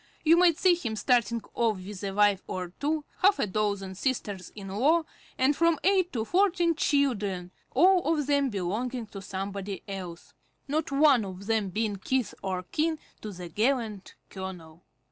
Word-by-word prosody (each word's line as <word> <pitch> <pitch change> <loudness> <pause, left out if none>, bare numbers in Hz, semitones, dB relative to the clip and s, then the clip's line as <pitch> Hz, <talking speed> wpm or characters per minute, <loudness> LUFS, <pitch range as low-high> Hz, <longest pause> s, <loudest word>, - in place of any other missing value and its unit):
You 325 +1 +6
might 340 -2 +5
see 370 -1 +5
him 240 -11 -3
starting 235 0 +1
off 225 -3 +1
with 185 +1 -8
a 200 - -1
wife 205 -1 +3
or 180 -1 -4
two, 300 +1 -1
half 400 +2 +5
a - - +1
dozen 200 -1 -1
sisters 200 -4 -3
in 195 -2 -8
law, 290 - +3 0.3
and 265 +3 +3
from 335 0 +3
eight 375 -1 +3
to 225 -3 -1
fourteen 355 - +2
children, 210 - 0 0.2
all 350 +3 +4
of 300 -3 +1
them 280 -1 +2
belonging 225 +5 -3
to 205 -2 -9
somebody 195 0 -5
else; 185 -4 -7 0.3
not 300 +1 -1
one 275 -4 +5
of 190 0 -8
them 220 -2 0
being 210 +1 -1
kith 255 +5 -1
or 185 -1 -3
kin 315 - -1 0.2
to 215 - -6
the 180 -2 -8
gallant 215 0 -1 0.2
colonel. 180 -4 -8
220 Hz, 165 wpm, -28 LUFS, 195-295 Hz, 0.3 s, You